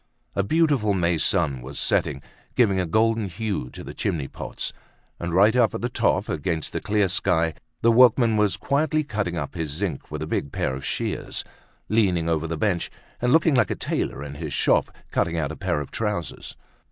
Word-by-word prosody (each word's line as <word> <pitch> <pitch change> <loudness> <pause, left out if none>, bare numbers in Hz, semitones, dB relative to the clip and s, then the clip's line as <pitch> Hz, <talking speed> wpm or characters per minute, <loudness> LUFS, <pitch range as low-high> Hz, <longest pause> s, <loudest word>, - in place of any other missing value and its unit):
A 100 - +2
beautiful 135 -4 +2
May 85 -2 +1
sun 75 -10 +2
was 65 +3 -8
setting, 70 -1 0 0.3
giving 100 -6 +3
a 90 - 0
golden 110 +2 +2
hue 95 - -3
to - - -10
the - - -8
chimney 75 -5 -2
pots. - - -5 0.5
And, 85 0 -3
right 100 +6 +5
up 120 -3 +3
at - - -4
the 120 - -1
top, - - +1
against 85 -4 -2
the - - -2
clear 105 -1 +2
sky, 85 -3 +1 0.3
the 115 - +6
workman 120 -1 +6
was 105 -3 +2
quietly 155 +2 +1
cutting 105 - -2
up 75 -3 -4
his 80 -3 -3
zinc 85 +1 -3
with 75 0 -4
a - - -3
big 70 -3 -2
pair 65 - -1
of 65 0 -6
shears, - - -3 0.4
leaning 95 -7 +2
over 80 -1 0
the 80 0 -3
bench, 95 -2 0 0.3
and 125 0 +2
looking 160 +1 +4
like 120 -7 +3
a - - -1
tailor 70 - -2
in 70 -1 -7
his 70 - -5
shop - - +3 0.2
cutting 85 0 0
out 80 -2 -1
a - - -6
pair 90 -5 -1
of 75 - -6
trousers. 105 -7 -3
95 Hz, 200 wpm, -24 LUFS, 80-110 Hz, 0.5 s, the